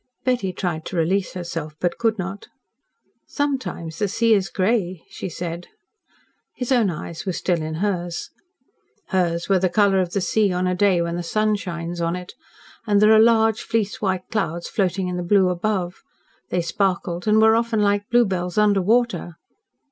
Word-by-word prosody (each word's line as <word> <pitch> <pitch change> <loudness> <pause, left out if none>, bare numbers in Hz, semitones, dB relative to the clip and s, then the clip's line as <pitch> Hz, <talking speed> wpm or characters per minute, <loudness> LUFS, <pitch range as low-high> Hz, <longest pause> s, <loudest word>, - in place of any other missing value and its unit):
Betty 245 -7 +1
tried 175 -3 -3
to - - -6
release 185 +3 0
herself, 165 -4 -5
but 175 -1 -1
could 225 -1 +1
not. 190 +1 -5 0.8
"Sometimes 260 - -3
the 205 - +1
sea 225 +3 +2
is 195 -3 +1
grey," 185 -3 0
she - - -5
said. 170 +1 -6 0.9
His 250 0 -4
own 235 -6 +4
eyes 165 0 -6
were 190 - -2
still 175 -1 0
in 155 0 -4
hers. 175 -2 -2 0.8
"Hers 170 -3 0
were 195 -2 +3
the 185 0 +1
colour 195 +1 +3
of 180 -2 -1
the 200 - +1
sea 205 +1 +2
on 180 0 0
a 180 - +1
day 180 -2 +3
when 170 0 -3
the - - -2
sun 215 +5 +1
shines 170 -3 -5
on 170 +1 0
it, 180 0 -8 0.5
and 205 -1 +4
there 210 +1 +6
are 215 - +7
large 225 -1 +4
fleece 220 -3 -2
white 190 -3 -1
clouds 170 -6 -2
floating 190 -1 -1
in 180 0 -3
the - - -2
blue 185 +1 +3
above. 180 0 -2 0.5
They 175 -1 0
sparkled 180 0 -1
and 215 +1 +5
were 220 0 +6
often 230 -2 +1
like 205 0 +1
bluebells 190 -7 +1
under 205 -2 +4
water." 225 -4 +1
190 Hz, 180 wpm, -22 LUFS, 175-215 Hz, 0.9 s, are